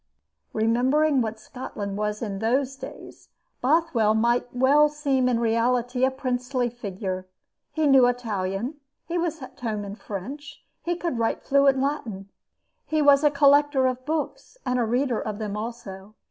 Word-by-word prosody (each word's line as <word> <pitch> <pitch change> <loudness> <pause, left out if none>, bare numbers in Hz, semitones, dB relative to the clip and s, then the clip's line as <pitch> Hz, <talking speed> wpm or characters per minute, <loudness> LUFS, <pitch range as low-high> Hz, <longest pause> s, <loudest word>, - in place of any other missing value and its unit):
Remembering 260 +6 +2
what 220 -1 -3
Scotland 215 -4 -6
was 210 +1 -2
in 200 -3 -4
those 260 +5 0
days, - - -11 0.3
Bothwell 255 -7 +2
might 235 +2 +2
well 280 +4 +4
seem 275 -4 +1
in 235 -2 +1
reality 240 +2 +1
a 260 - +5
princely 250 -1 -2
figure. 190 -5 -5 0.4
He 315 -1 0
knew 270 -3 +6
Italian; 225 +1 -2 0.3
he 345 +1 -2
was 325 -4 -2
at - - -12
home 215 -4 -3
in 200 - -6
French; 235 +8 -8 0.2
he 345 +1 -1
could 335 -8 -3
write 225 - -1
fluent 275 -1 +4
Latin. 235 -9 -3 0.6
He 310 - 0
was 285 0 +6
a 295 - +6
collector 285 -1 +4
of 255 0 -1
books 315 - -4
and 250 0 0
a 240 - +2
reader 245 +1 0
of 215 -1 -4
them 210 -2 -4
also. 215 -3 -7
250 Hz, 155 wpm, -25 LUFS, 220-280 Hz, 0.6 s, knew